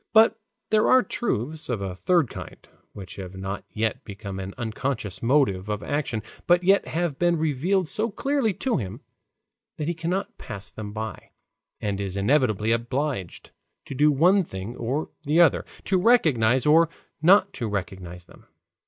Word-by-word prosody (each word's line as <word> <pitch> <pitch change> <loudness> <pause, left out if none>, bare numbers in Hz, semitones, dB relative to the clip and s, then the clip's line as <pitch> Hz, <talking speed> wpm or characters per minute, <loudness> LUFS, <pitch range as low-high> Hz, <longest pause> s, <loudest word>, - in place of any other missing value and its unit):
But 225 0 +6 0.3
there 215 0 +4
are 255 -1 +6
truths 155 - -3
of 120 -4 -1
a 95 -2 -4
third 170 - +2
kind, - - -9 0.3
which 95 -3 -9
have 95 -1 -7
not 95 +1 -4
yet 110 +5 -2
become 100 -1 -7
an 95 +1 -6
unconscious 110 -4 -3
motive 115 -7 +2
of 105 0 -2
action, 135 -7 -2 0.2
but 175 +1 +4
yet 195 +2 +4
have 165 -4 -2
been 175 -1 +3
revealed 160 +5 +1
so 220 +7 0
clearly 270 +1 0
to 260 -3 0
him 105 0 -5 0.8
that 155 -2 -3
he 170 - 0
cannot 175 +4 -3
pass 100 -1 -8
them 105 -2 -7
by, 110 +1 -6 0.5
and 100 -1 -2
is 100 -1 -4
inevitably 110 -1 +2
obliged 120 - -2 0.3
to - - -7
do 150 +3 +4
one 180 +7 +4
thing 95 - -7
or 130 +6 -3
the 150 +4 +1
other, 170 - +5 0.2
to 190 -1 +2
recognize 130 - +4
or 160 +2 +5 0.3
not 190 +4 +5
to 115 - -3
recognize 95 -3 -5
them. - - -19
130 Hz, 160 wpm, -25 LUFS, 105-175 Hz, 0.8 s, But